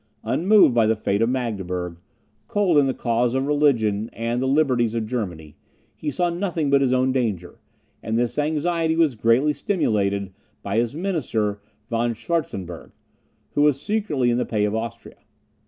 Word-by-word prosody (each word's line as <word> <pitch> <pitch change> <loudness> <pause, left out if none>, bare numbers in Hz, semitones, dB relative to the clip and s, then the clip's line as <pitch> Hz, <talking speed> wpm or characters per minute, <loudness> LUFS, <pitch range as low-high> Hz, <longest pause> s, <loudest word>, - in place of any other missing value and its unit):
Unmoved 175 - +4
by 115 -2 +3
the 110 - +3
fate 100 -1 -1
of 115 - +3
Magdeburg, 95 -9 -3 0.5
cold 190 -7 +3
in 140 - +3
the 130 - 0
cause 120 +1 0
of 130 +1 0
religion 120 -8 +1
and 115 +2 -2
the 130 - 0
liberties 130 -5 +2
of 115 -1 -1
Germany, 90 - -5 0.4
he 150 - -4
saw 175 +5 0
nothing 170 -5 -1
but 140 0 +4
his 130 -2 +2
own 130 +1 +2
danger; 105 -9 -2 0.4
and 110 +1 -2
this 120 +4 0
anxiety 160 +2 0
was 160 -4 +3
greatly 120 +6 +2
stimulated 100 - 0 0.3
by 100 +2 -2
his 120 +3 0
minister 120 - -2 0.3
Von 115 0 -1
Schwartzenburgh, 110 - -4 0.6
who 145 - 0
was 145 -2 +3
secretly 150 - 0
in 120 - +1
the - - +1
pay 105 -2 0
of 105 - -1
Austria. 110 0 -5
120 Hz, 165 wpm, -23 LUFS, 110-150 Hz, 0.6 s, Unmoved